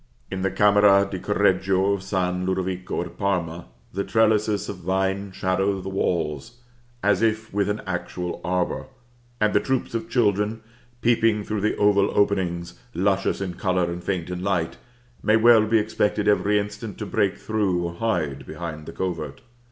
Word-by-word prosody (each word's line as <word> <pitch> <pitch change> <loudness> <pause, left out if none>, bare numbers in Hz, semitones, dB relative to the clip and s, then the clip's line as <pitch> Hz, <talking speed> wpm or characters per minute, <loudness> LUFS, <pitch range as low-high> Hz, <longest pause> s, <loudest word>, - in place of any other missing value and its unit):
In 95 -1 -3
the 95 - +1
Camera 100 -1 +5
di 95 - -3
Correggio 95 -1 +2
of 100 - -2
San 90 -2 -1
Lodovico 95 -1 -2
at 85 - -12
Parma, 85 - -1 0.3
the 100 +2 -1
trellises 110 -2 +2
of 100 - -5
vine 95 +2 -1
shadow 95 +1 0
the 95 - -5
walls, 85 +2 -1 0.5
as 100 -1 +3
if 110 -1 0
with 100 0 +1
an 105 +1 -2
actual 90 -1 -4
arbor; 90 +5 -1 0.5
and 105 -1 +2
the - - +5
troops 130 0 -1
of 115 -1 -3
children, 105 -2 +1 0.4
peeping 115 -3 +3
through 105 0 -3
the 105 - +1
oval 100 -1 +4
openings, 90 -4 0 0.2
luscious 95 +1 +1
in 95 -2 -3
color 90 -1 0
and 85 0 -6
faint 90 -3 -2
in 90 0 -4
light, 90 -4 -1 0.4
may 110 - +3
well 110 -1 +6
be 115 +1 +4
expected 105 -1 0
every 105 0 +3
instant 105 0 -4
to 105 - -4
break 100 -1 0
through, 100 -5 0
or 85 0 -3
hide 85 -9 -1
behind 80 -3 -6
the - - -7
covert. 80 -6 -4
100 Hz, 165 wpm, -24 LUFS, 90-105 Hz, 0.5 s, well